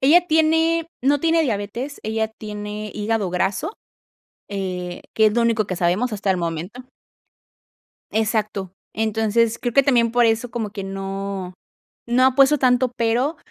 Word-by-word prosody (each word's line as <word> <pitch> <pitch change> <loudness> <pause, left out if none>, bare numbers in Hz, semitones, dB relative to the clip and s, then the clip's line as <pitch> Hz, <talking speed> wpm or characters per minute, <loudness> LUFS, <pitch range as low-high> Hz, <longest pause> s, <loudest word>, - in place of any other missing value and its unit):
Ella 335 +6 +5
tiene 325 +1 +2 0.2
no 280 +2 +3
tiene 330 0 +3
diabetes, 235 +3 -3
ella 220 0 -1
tiene 210 -1 -7
hígado 210 -3 -1
graso, 190 - -1 0.8
eh, 180 -3 -4
que 220 - +5
es 215 - +2
lo 240 - +2
único 230 -3 +1
que 185 - -3
sabemos 185 +8 +1
hasta 200 -1 -1
el 185 - +2
momento. 175 +8 -4 1.3
Exacto. 215 -4 -1 0.2
Entonces, 220 +1 +1
creo 240 -2 -2
que 275 - +5
también 240 -4 +3
por 245 0 +4
eso 225 +2 +1
como 225 -4 -3
que 200 -2 -6
no, 195 -1 -5 0.5
no 250 +2 +4
ha 260 -1 +3
puesto 275 +2 +5
tanto 250 -1 +2
pero 245 +7 0
220 Hz, 150 wpm, -22 LUFS, 200-255 Hz, 1.3 s, Ella